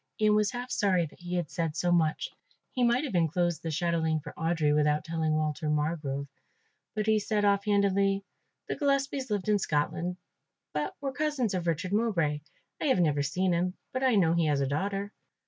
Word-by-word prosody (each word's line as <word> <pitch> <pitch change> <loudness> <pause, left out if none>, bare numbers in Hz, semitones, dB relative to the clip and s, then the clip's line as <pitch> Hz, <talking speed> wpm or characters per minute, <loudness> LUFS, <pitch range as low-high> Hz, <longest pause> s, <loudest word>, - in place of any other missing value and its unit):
Ian 215 -1 +4
was 210 -1 +3
half 245 +2 -5
sorry 185 -4 +2
that 155 - -14
he 175 0 -4
had 175 -4 -2
said 165 -4 -2
so 175 +1 +1
much, 160 -3 +1 0.4
he 250 - 0
might 240 +3 +3
have 275 - -4
enclosed 175 0 +1
the 165 - -4
chatelaine 160 -1 0
for 150 0 -9
Audry 160 -2 +1
without 150 0 +2
telling 160 -1 -1
Walter 155 -1 -1
Margrove; 150 -2 -1 0.7
but 215 -1 0
he 220 0 +3
said 210 0 0
off 200 0 +3
handedly; 200 -1 +2 0.4
"The - - -2
Gillespies 275 -2 0
lived 205 -2 -1
in 210 -1 +3
Scotland, 170 +2 -1 0.6
but 150 0 -2
were 275 -1 -2
cousins 285 -8 0
of 175 -2 -2
Richard 170 +3 -1
Mowbray. 170 -10 +1 0.4
I - - 0
have 265 -9 +3
never 150 -4 +2
seen 180 +6 +1
him, 180 +2 0 0.2
but 255 - -1
I 255 -3 +4
know 170 -5 +4
he 170 -2 +2
has 145 -2 +2
a 140 - +1
daughter." 195 +8 -2
175 Hz, 195 wpm, -29 LUFS, 155-210 Hz, 0.7 s, Ian